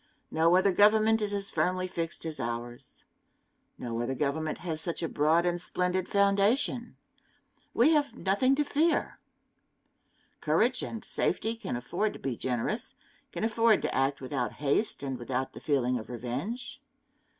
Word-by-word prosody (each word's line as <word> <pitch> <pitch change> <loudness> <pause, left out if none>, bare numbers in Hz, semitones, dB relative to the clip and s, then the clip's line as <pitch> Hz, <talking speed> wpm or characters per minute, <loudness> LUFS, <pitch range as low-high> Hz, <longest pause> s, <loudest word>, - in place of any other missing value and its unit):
No 165 +2 +4
other 190 +2 +4
government 215 +3 +4
is 210 -1 -1
as 200 -1 -2
firmly 185 0 0
fixed 165 -2 -4
as 155 -3 -5
ours. 120 0 -6 0.7
No 115 -1 -4
other 130 +3 -2
government 155 +2 -1
has 160 -2 -2
such 170 0 -2
a - - 0
broad 160 +3 +2
and 175 0 0
splendid 180 0 -1
foundation. 205 +5 +2 0.8
We 255 +7 +5
have 295 -2 +1
nothing 255 +8 +2
to 295 - +1
fear. 310 +3 +1 1.2
Courage 225 +12 +2
and 225 - -6
safety 225 +1 -1
can 225 - -5
afford 175 - -2
to - - -10
be 135 -3 -3
generous 130 - -2 0.4
can - - -4
afford 225 -1 +3
to - - -1
act 135 +1 0
without 135 +1 -3
haste 145 +6 0
and 135 -2 -4
without 130 +2 -3
the - - -10
feeling 125 -4 +1
of 110 - -10
revenge. 200 - -5
175 Hz, 150 wpm, -29 LUFS, 135-220 Hz, 1.2 s, We